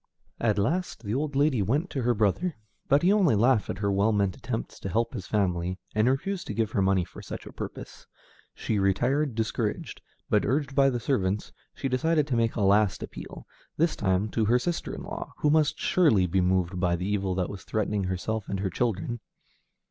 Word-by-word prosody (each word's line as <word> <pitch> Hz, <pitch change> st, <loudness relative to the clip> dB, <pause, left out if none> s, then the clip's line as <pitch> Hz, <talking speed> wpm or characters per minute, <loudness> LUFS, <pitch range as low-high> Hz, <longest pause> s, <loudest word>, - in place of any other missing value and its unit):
At 110 Hz, -3 st, +1 dB
last, 155 Hz, -, -1 dB
the 105 Hz, 0 st, -3 dB
old 145 Hz, +2 st, -1 dB
lady 140 Hz, -5 st, +3 dB
went 145 Hz, -, 0 dB
to 135 Hz, -, -2 dB
her 120 Hz, 0 st, +2 dB
brother, 110 Hz, -, +1 dB, 0.3 s
but 140 Hz, +4 st, +4 dB
he 190 Hz, +3 st, +5 dB
only 185 Hz, -, +4 dB
laughed 115 Hz, 0 st, +3 dB
at -, -, -3 dB
her 100 Hz, 0 st, 0 dB
well 100 Hz, +3 st, +3 dB
meant 100 Hz, -3 st, +1 dB
attempts -, -, -5 dB
to 95 Hz, -, -5 dB
help 115 Hz, +5 st, 0 dB
his 95 Hz, -, -6 dB
family, 90 Hz, -3 st, 0 dB, 0.2 s
and 110 Hz, +3 st, +3 dB
refused 180 Hz, +8 st, -1 dB
to -, -, -4 dB
give 110 Hz, -2 st, 0 dB
her 100 Hz, -, +1 dB
money 95 Hz, -1 st, +3 dB
for -, -, -12 dB
such -, -, -7 dB
a -, -, -9 dB
purpose. -, -, -8 dB, 0.5 s
She 105 Hz, -, -1 dB
retired 120 Hz, +8 st, +1 dB
discouraged, 110 Hz, -1 st, -2 dB, 0.3 s
but, -, -, +2 dB
urged 135 Hz, +3 st, 0 dB
by 135 Hz, 0 st, +5 dB
the 120 Hz, -2 st, -1 dB
servants, 105 Hz, -5 st, -1 dB, 0.2 s
she -, -, -2 dB
decided 150 Hz, +4 st, +2 dB
to 135 Hz, -4 st, -1 dB
make 115 Hz, -1 st, +1 dB
a 110 Hz, -, -1 dB
last 100 Hz, 0 st, +3 dB
appeal, -, -, -9 dB, 0.3 s
this 165 Hz, +1 st, +2 dB
time 95 Hz, 0 st, +1 dB
to 110 Hz, +1 st, 0 dB
her 120 Hz, +4 st, +4 dB
sister 170 Hz, +7 st, -2 dB
in -, -, -7 dB
law, -, -, -6 dB
who 150 Hz, -, +2 dB
must 155 Hz, 0 st, +3 dB
surely 130 Hz, -, +3 dB
be 95 Hz, +2 st, +1 dB
moved 90 Hz, 0 st, +1 dB
by 90 Hz, -1 st, +2 dB
the 90 Hz, +2 st, -3 dB
evil 100 Hz, -2 st, 0 dB
that 90 Hz, -1 st, -1 dB
was 100 Hz, -3 st, -8 dB
threatening 105 Hz, -2 st, -1 dB
herself 95 Hz, +3 st, -3 dB
and 100 Hz, -, -2 dB
her 95 Hz, -2 st, -1 dB
children. 120 Hz, +2 st, -1 dB
110 Hz, 210 wpm, -27 LUFS, 95-135 Hz, 0.5 s, he